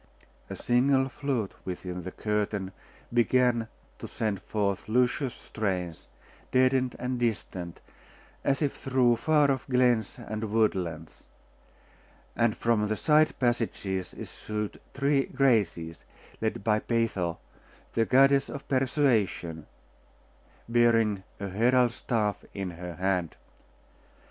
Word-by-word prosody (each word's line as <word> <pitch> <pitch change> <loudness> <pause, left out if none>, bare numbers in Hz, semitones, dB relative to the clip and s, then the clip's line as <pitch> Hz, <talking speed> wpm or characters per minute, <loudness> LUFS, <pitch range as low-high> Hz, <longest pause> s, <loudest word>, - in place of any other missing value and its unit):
A - - -5
single 130 +2 +2
flute 130 -7 -2
within 90 0 -5
the 95 - -6
curtain 105 -2 -2 0.4
began 120 0 +3 0.3
to - - -6
send 105 -3 -2
forth 100 -1 -2
luscious 125 +2 +1
strains, 90 -6 -4 0.4
deadened 130 -1 +3
and 125 0 -3
distant, 100 -7 -3 0.6
as 140 +2 +1
if 140 - 0
through 125 -3 +2
far 150 +1 +3
off 130 -3 -3
glens 125 -5 +2
and 110 0 -5
woodlands; 90 -8 -1 1.1
and 115 -2 +2
from 115 -2 +1
the 110 0 -1
side 155 +1 +3
passages 110 -6 -1
issued 105 -1 -5
three 140 0 +2
Graces, 100 - +1 0.4
led 110 0 -2
by 110 -1 +2
Peitho, 105 -8 -1 0.6
the 115 - +3
goddess 135 +2 +4
of 140 - -7
persuasion, 120 - +1 1.0
bearing 115 -4 +3 0.2
a 100 - -3
herald's 120 +5 +3
staff 105 -4 -1
in 95 -2 -3
her 90 0 -7
hand. 90 -3 -1
115 Hz, 110 wpm, -28 LUFS, 100-130 Hz, 1.1 s, goddess